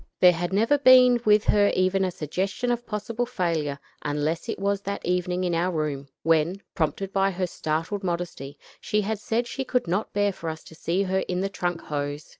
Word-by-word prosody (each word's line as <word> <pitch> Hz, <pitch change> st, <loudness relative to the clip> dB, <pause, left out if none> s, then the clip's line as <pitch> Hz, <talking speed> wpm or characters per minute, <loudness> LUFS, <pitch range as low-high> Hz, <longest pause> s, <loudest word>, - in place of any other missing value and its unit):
There 180 Hz, -, +8 dB
had 175 Hz, +1 st, -3 dB
never 225 Hz, +9 st, +3 dB
been 255 Hz, -2 st, +7 dB
with 210 Hz, 0 st, +5 dB
her 205 Hz, -1 st, +4 dB
even 185 Hz, +1 st, +2 dB
a 185 Hz, -, +1 dB
suggestion 190 Hz, -, -2 dB
of 240 Hz, 0 st, -2 dB
possible 225 Hz, +3 st, -3 dB
failure, 165 Hz, -, -1 dB, 0.2 s
unless 150 Hz, +7 st, -2 dB
it -, -, -2 dB
was 200 Hz, 0 st, 0 dB
that 200 Hz, 0 st, -4 dB
evening 180 Hz, 0 st, 0 dB
in 175 Hz, -1 st, 0 dB
our 175 Hz, +2 st, +1 dB
room, 150 Hz, -4 st, -2 dB, 0.2 s
when, 165 Hz, +4 st, +2 dB
prompted 185 Hz, +4 st, -2 dB
by 195 Hz, 0 st, +3 dB
her 185 Hz, -1 st, -2 dB
startled 165 Hz, +4 st, -3 dB
modesty, 170 Hz, -6 st, -4 dB, 0.2 s
she 210 Hz, -1 st, 0 dB
had 210 Hz, +1 st, -2 dB
said 225 Hz, +3 st, -1 dB
she 265 Hz, +3 st, -4 dB
could 250 Hz, -5 st, -1 dB
not 190 Hz, +6 st, -1 dB
bear 205 Hz, 0 st, +1 dB
for 165 Hz, -2 st, -5 dB
us 160 Hz, 0 st, -7 dB
to -, -, -14 dB
see 170 Hz, +4 st, -1 dB
her 190 Hz, 0 st, 0 dB
in 180 Hz, 0 st, -1 dB
the 195 Hz, -, -1 dB
trunk 175 Hz, -3 st, -2 dB
hose. 145 Hz, 0 st, -4 dB
185 Hz, 205 wpm, -25 LUFS, 165-205 Hz, 0.2 s, There